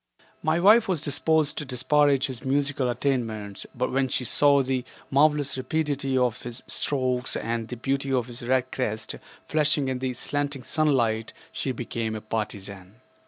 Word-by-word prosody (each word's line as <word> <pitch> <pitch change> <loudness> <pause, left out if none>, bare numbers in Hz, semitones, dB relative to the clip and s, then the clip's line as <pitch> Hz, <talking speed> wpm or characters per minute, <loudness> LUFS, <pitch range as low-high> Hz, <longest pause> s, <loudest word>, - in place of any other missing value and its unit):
My 155 +2 +1
wife 215 +5 +6
was 175 -6 -1
disposed 150 +1 +2
to - - -3
disparage 140 +1 +2
his 130 -2 -6
musical 140 -1 0
attainments, 115 -5 -2
but 125 - -1
when 135 0 +1
she 125 0 -1
saw 140 +2 +5
the 130 -1 -1 0.3
marvelous 145 0 +3
rapidity 140 -1 -1
of 125 -2 +1
his 120 0 -6
strokes 130 -2 0
and 115 -1 -2
the 125 - -6
beauty 135 +2 -1
of 125 -3 +1
his 120 0 -10
red 130 +1 0
crest 110 -4 -2 0.3
flashing 150 -3 +2
in 130 -1 -2
the 130 -1 -2
slanting 145 0 -2
sunlight 120 -8 +1 0.2
she 135 - -2
became 115 -2 -3
a 110 - -5
partisan. 100 -3 -5
130 Hz, 160 wpm, -26 LUFS, 120-145 Hz, 0.3 s, wife